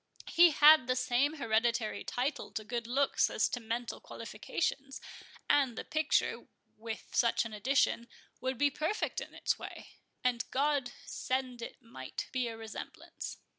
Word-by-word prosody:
He 345 +1 +8
had 300 -3 +7
the 255 - +2
same 250 +4 +2
hereditary 230 -4 0
title 260 +5 -2
to 215 - -3
good 235 +1 -4
looks 275 +3 +2
as - - +2
to 245 - -3
mental 230 +1 -3
qualifications; 275 -4 -3 0.5
and 270 -5 +3
the - - -3
picture, 310 -1 0 0.3
with 225 0 -7
such 235 -1 +3
an 225 - -6
addition, 235 +1 +1 0.3
would 260 0 -2
be 285 +3 +3
perfect 315 +9 -1
in - - -9
its - - 0
way—and 245 -2 -5
God 275 -2 +1
send 255 -2 -2
it 240 - -8
might 130 - -7
be 255 -2 0
a 225 -1 -6
resemblance." 225 -1 -7
250 Hz, 145 wpm, -32 LUFS, 230-280 Hz, 0.5 s, He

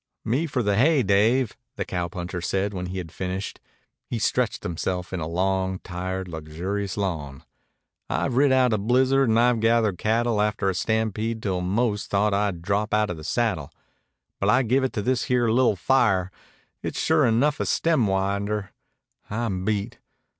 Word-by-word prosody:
"Me 135 +9 0
for 130 -4 -1
the 100 -1 +1
hay, 140 +4 +4
Dave," 110 +5 +2 0.2
the - - -3
cowpuncher 90 0 -4
said 95 +4 -1
when 90 -1 -4
he 95 +1 -5
had 85 -3 -6
finished. 95 +2 -4 0.5
He 120 - -3
stretched 120 +1 0
himself 90 +2 -3
in 90 - -2
a 80 - -3
long, 95 +2 0
tired, 95 +1 -5
luxurious 90 +5 -4
yawn. 80 -9 -3 0.7
"I've 130 - -1
rid 140 +1 +4
out 130 -3 +4
a 105 - +1
blizzard 130 +4 +3
and 110 +1 +3
I've 120 -1 +3
gathered 110 -4 +2
cattle 115 0 +1
after 105 -2 +1
a - - -4
stampede 110 +3 -1
till 95 -3 -1
I - - -4
'most 105 +2 0
thought 100 +1 +2
I'd 100 -4 -1
drop 105 +2 0
outa 105 -3 +1
the 80 -2 -10
saddle. 90 - -1 0.7
But 100 - +1
I 130 +4 +4
give 130 +3 +2
it 130 - -1
to 105 - -2
this 125 +2 0
here 125 -2 +2
li'l' 120 -2 +3
fire. 95 -4 +2 0.5
It's - - -4
sure - - +3
enough 135 +6 +2
a - - 0
stemwinder. 100 -7 0 0.6
I'm 105 -4 -2
beat. 105 -1 -2
105 Hz, 170 wpm, -24 LUFS, 95-120 Hz, 0.7 s, hay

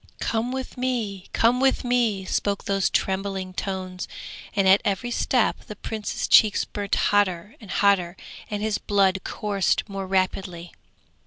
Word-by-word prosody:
'Come 230 +2 -1
with 260 0 -5
me, 225 -7 -2
come 235 +2 +3
with 270 0 +2
me,' 235 -6 +1
spoke 200 +1 -1
those 195 -1 +1
trembling 190 -1 -1
tones, 185 -1 -4 0.5
and 195 -1 +3
at 190 +2 +6
every 205 +5 -1
step 240 0 +1
the 210 - -7
Prince's 215 +1 -4
cheeks 215 -2 +5
burnt 205 -1 -2
hotter 205 -1 +1
and 210 - -12
hotter 190 -2 +2 0.3
and 210 0 -3
his 215 -1 0
blood 195 -2 +2
coursed 205 -1 -1
more 195 -2 -5
rapidly. 185 -2 -1
200 Hz, 145 wpm, -24 LUFS, 190-220 Hz, 0.5 s, at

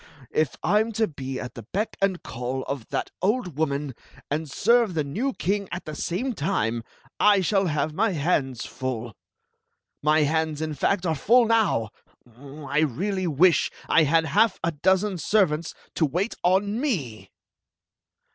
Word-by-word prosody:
If 155 -4 0
I 210 - +3
*m 220 +1 0
to 220 +1 +1
be 135 -4 -6
at 125 -1 -6
the 115 - -8
beck 195 - -3
and 195 -2 0
call 125 +2 -4
of 140 -5 -5
that - - -3
old 190 - 0
woman, 145 -2 -1 0.4
and 155 +1 -2
serve 230 - +3
the 155 - +1
new 210 - -2
king 200 -3 -2
at 175 - -5
the 155 - -6
same 185 - -2
time, 115 - -1 0.4
I 205 -2 +5
shall 195 +1 +2
have 150 -1 -1
my 205 +4 +1
hands 140 -6 0
full. 120 -3 -5 0.9
My 155 +1 +3
hands, 155 0 0
in 155 -1 -3
fact, 185 +6 0
are 165 - +1
full 235 - +4
now. 220 - +2 0.5
I 140 +3 -4
really 185 - 0
wish 165 +3 +4 0.2
I - - +5
had 160 +2 +3
half 210 +4 +3
a 170 - +1
dozen 190 +5 +1
servants 165 -5 +1 0.2
to 160 - +2
wait 180 - -1
on 200 +5 +2
me!'' 135 - -3
160 Hz, 160 wpm, -25 LUFS, 140-200 Hz, 0.9 s, I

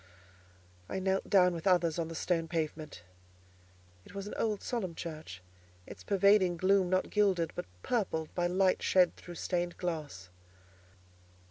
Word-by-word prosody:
I - - -3
knelt 190 0 -1
down 180 -2 +5
with 165 +2 -4
others 175 -3 +3
on 165 - -1
the 165 - -7
stone 165 -1 0
pavement. 155 - -4 1.0
It - - -15
was 200 0 -5
an 210 - -7
old 215 -3 -1
solemn 190 -9 -3
church, 155 - -7 0.4
its - - -11
pervading 200 -2 +4
gloom 185 +1 +3
not 185 0 0
gilded 190 -6 +2
but - - -5 0.2
purpled 185 -10 -1
by 175 -1 0
light 185 +1 +2
shed 180 -2 +3
through 175 - -11
stained 175 0 -2
glass. 155 - -5
180 Hz, 145 wpm, -31 LUFS, 165-190 Hz, 1.0 s, down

